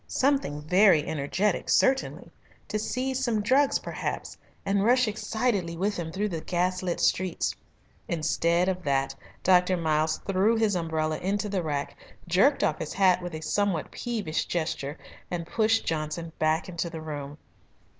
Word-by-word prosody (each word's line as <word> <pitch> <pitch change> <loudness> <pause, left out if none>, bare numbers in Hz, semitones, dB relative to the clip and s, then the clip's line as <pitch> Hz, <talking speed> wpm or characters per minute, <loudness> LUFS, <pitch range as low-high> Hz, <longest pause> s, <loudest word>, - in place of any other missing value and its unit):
Something 265 - 0
very 180 -2 +5
energetic, 170 +7 -1
certainly 270 0 +2 0.4
to 215 - -1
seize 260 +4 -2
some 225 -4 0
drugs, 270 +5 +3
perhaps, - - -5 0.3
and 195 0 +1
rush 250 +2 +4
excitedly 215 -5 -1
with 205 +4 0
him 165 -2 -4
through 205 +4 -1
the 165 -4 -4
gaslit 180 +1 -1
streets. 185 -2 +1 0.5
Instead 170 +2 +1
of 185 -1 -1
that 135 -3 0 0.3
Dr. 180 0 +4
Miles 155 -1 +1
threw 195 +4 +2
his 220 -3 +2
umbrella 160 -2 -1
into 200 +3 -1
the 195 -2 -1
rack, 145 -3 -3 0.3
jerked 200 - +3
off 155 - +1
his 155 - -4
hat 185 -2 +4
with 175 -2 -5
a 155 - -6
somewhat 195 -2 0
peevish 215 -10 -2
gesture, 160 -3 -3 0.3
and 170 -2 -3
pushed 220 +5 +1
Johnson 160 +1 -3
back 155 +1 +1
into 170 -1 -3
the 165 -1 -7
room. 145 -2 -6
180 Hz, 150 wpm, -27 LUFS, 160-210 Hz, 0.5 s, very